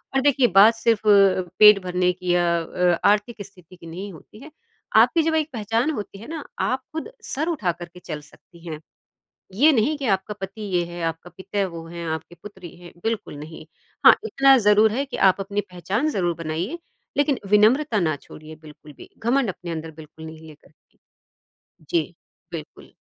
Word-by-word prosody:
और 270 - +3
देखिए 275 -2 +3
बात 210 +4 +8
सिर्फ़ 225 -2 0
अ, 195 -2 +5 0.2
पेट 210 -1 +9
भरने 180 0 +1
की 180 0 -2
या 175 0 +2 0.2
अ - - -5
अ, 175 +1 0
आर्थिक 210 +2 0
स्थिति 185 -3 -18
की 170 -2 -14
नहीं 190 +5 -7
होती 210 +6 -15
है। 300 +3 -13 0.5
आपकी 335 - +5
जब 320 0 0
एक 310 -1 0
पहचान 225 +5 -1
होती 205 -7 -7
है 225 - -11
ना 320 -2 -6 0.2
आप 255 - 0 0.2
ख़ुद 320 +8 -5
सर 305 +4 -3
उठा 240 - -1
कर 175 +1 -9
के 180 - -13
चल 155 -4 -7
सकती 170 +3 -18
हैं। 155 -2 -6 0.8
ये 290 +10 +5
नहीं 270 +4 +1
कि 270 - -4
आपका 190 +2 -2
पति 195 +3 -7
ये 185 -4 0
है, 175 0 -8
आपका 165 +1 -4
पिता 195 +1 -2
वो 165 -2 -9
हैं 170 0 -7
आपकी 160 +2 -9
पुत्री 190 -5 -11
हैं 175 -1 -13
बिल्कुल 225 -8 -3
नहीं। 155 +2 -10 0.4
हाँ, - - +11
इतना 275 -10 +5
ज़रूर 210 0 +4
है 270 +4 -1
कि - - -6
आप 190 +2 -5
अपनी 200 +1 -2
पहचान 195 - -2
ज़रूर 175 - -1
बनाइए 170 - -3 0.4
लेकिन 285 -1 +1
विनम्रता 220 +3 +3
ना 155 -4 0
छोड़िए 155 0 -12
बिल्कुल 150 0 -14
भी। - - -13
घमंड 240 +1 +1
अपने 175 -1 -8
अंदर 160 0 -5
बिल्कुल 160 0 -12
नहीं 160 0 -11
लेकर 150 -1 -17
के - - -39 0.9
जी। 165 0 -1 0.4
बिल्कुल। 155 -3 -9
195 Hz, 195 wpm, -23 LUFS, 170-230 Hz, 0.9 s, हाँ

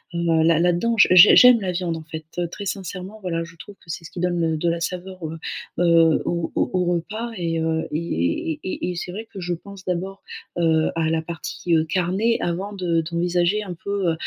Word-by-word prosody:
heu, 165 -2 +2
là 165 -1 +4
là-dedans. 175 +7 +2 0.2
J'ai 185 +3 +9
j'aime 250 -3 +8
la 185 - -1
viande, 175 -2 -2
en 160 - -8
fait, 160 -1 -7
heu, 175 - 0
très 200 +4 -8
sincèrement, 195 +1 -5
voilà, 165 -3 -2
je 165 0 -12
trouve 205 +4 -12
que 165 - -10
c'est 165 0 -6
ce - - -9
qui - - -8
donne, 170 -2 0
heu, - - -3
de 170 +2 0
la 170 0 -1
saveur, 185 +2 -5
heu 160 +1 -5 0.4
heu, 165 -2 +4
au 170 -1 -2
au - - 0
au 180 -1 +1
repas 215 +8 -4
et 165 -2 -1
heu, 160 0 -1
et 150 - -1
et - - -11
et 185 -1 -3
et 180 - -3
c'est 180 +1 -5
vrai, 220 +4 -7
que 195 - -8
je 175 -1 -2
pense 195 +2 -10
d'abord, 185 +2 -3 0.3
heu, 160 -2 +2
à 160 -1 0
la 160 - +1
partie, 170 +1 -3
heu, 160 - +3
carnée 190 +7 0
avant 185 +4 -2
de 175 -4 0
d'envisager 175 +2 +1
un 180 -3 -6
peu, 200 -4 0
heu - - 0
175 Hz, 225 wpm, -22 LUFS, 165-185 Hz, 0.4 s, J'ai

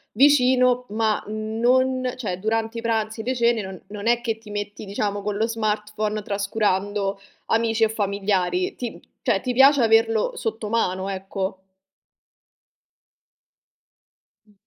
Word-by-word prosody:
vicino 255 -3 +4
ma 215 0 0
non 245 +4 +1
cioè 195 -8 -3
durante 225 +3 -1
i - - -6
pranzi, 220 -1 -1
le 255 +2 -1
cene, 235 -2 +2
non 190 -1 -8
non 205 +1 -7
è 240 0 +3
che 225 -2 -2
ti 220 -2 -13
metti 205 0 -5
diciamo 205 0 -2
con 205 -1 -2
lo 225 +1 +1
smartphone, 215 -1 -2
trascurando 200 -1 -1 0.3
amici 225 0 +2
e 220 - +4
familiari. 195 -4 0
Ti 240 -2 -4
p - - -13 0.2
cioè 210 -6 +1
ti 250 - -2
piace 270 +1 +6
averlo 225 -1 +3
sotto 220 -1 -4
mano, 190 -4 0
ecco. 190 0 -4 2.8
Mh. 210 - -26
215 Hz, 135 wpm, -23 LUFS, 205-230 Hz, 2.8 s, piace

